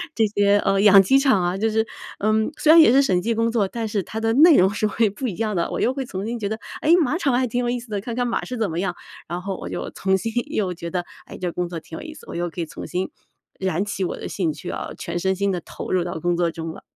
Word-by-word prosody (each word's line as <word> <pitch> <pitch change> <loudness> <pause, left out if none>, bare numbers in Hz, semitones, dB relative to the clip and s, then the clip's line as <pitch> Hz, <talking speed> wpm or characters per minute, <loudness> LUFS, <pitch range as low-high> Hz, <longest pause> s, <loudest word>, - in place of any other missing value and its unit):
这 225 - +3
些， 205 0 +3
呃， 195 -1 +1
养 200 -1 +8
鸡 265 +8 +4
场 260 -10 +3
啊， 175 +2 0
就 220 +3 +1
是 220 +1 +1 0.3
呃， 215 +2 +2 0.3
虽 310 - +4
然 330 - +9
也 270 - +7
是 270 +2 +6
审 185 -10 +2
计 230 +5 0
工 230 +1 +1
作， 215 -4 +1
但 225 +2 -4
是 205 -1 -1
它 220 - -5
的 225 0 +1
内 310 +4 +7
容 185 +1 +5
是 215 0 0
会 220 +1 +1
不 210 +6 -4
一 200 - -4
样 215 -1 -2
的， 170 - 0
我 - - -2
又 250 - +2
会 270 -1 -4
重新 225 +3 -4
觉 205 -2 -2
得， 220 - -4 0.2
哎， 310 - +3
马 295 +4 0
场 280 -8 +1
还 255 +1 +2
挺 245 +1 -2
有 240 - 0
意 245 0 -1
思 240 0 -13
的， 205 -2 -2
看 230 +2 -5
看 245 0 0
马 235 - -1
是 250 - -5
怎 220 -3 0
么 165 - -2
样， 180 -2 -1 0.3
然 175 +2 -4
后 190 0 -4
我 - - -7
就 - - -4
重新 190 +3 0 0.2
又 195 - -1
觉 170 0 -7
得， 175 0 -2 0.2
哎， - - -10
这 180 -1 -2
工 175 0 -3
作 170 -1 -5
挺 160 0 -10
有 - - -8
意 315 0 -8
思， - - -14
我 - - -7
又 175 0 -2
可 170 - -10
以 - - -2
重新 180 +3 -4 0.5
燃 190 0 -1
起 200 -2 -3
我 180 - -2
的 - - -6
兴 175 -5 -1
趣 - - -8
啊， - - -5
全 175 - -4
身 190 +2 +1
心 200 +1 0
地 180 -3 -2
投 - - -8
入 185 -1 +2
到 175 -2 -4
工 175 +2 0
作 170 -1 +1
中 165 -1 -5
了。 - - -12
200 Hz, 335 characters per minute, -22 LUFS, 180-230 Hz, 0.5 s, 然